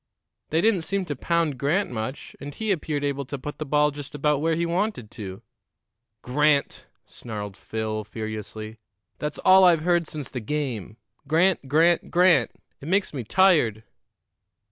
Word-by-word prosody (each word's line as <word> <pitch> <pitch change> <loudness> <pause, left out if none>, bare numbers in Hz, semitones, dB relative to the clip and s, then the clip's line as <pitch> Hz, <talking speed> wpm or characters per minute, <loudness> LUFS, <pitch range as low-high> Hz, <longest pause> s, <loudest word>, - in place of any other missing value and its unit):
"They 160 +2 +2
didn't 210 -3 +3
seem 195 +4 -1
to 145 - -4
pound 165 -2 0
Grant 165 +8 +1
much, 115 +3 -5
and 145 +1 -8
he 220 -1 -1
appeared 150 -5 -1
able 140 -1 -1
to 140 +2 -5
put 145 +3 -7
the 155 - -4
ball 150 +1 +3
just 145 0 -9
about 145 0 +1
where 165 +1 +1
he 170 +1 0
wanted 170 - -2
to." 95 +1 -8 0.8
"Grant!" 145 +2 +1 0.2
snarled 105 -4 -7
Phil 110 0 -4
furiously. 110 0 -6 0.4
"That's 150 0 -3
all 190 0 +6
I've 170 -4 +5
heard 175 -1 +2
since 150 -3 -7
the 125 - -4
game! 120 -5 -4 0.3
Grant, 165 0 +2
Grant, 165 +5 +3
Grant! 180 0 +4 0.3
It 140 - -10
makes 190 +1 +1
me 130 -4 -4
tired!" 135 - +3
150 Hz, 160 wpm, -25 LUFS, 120-170 Hz, 0.8 s, all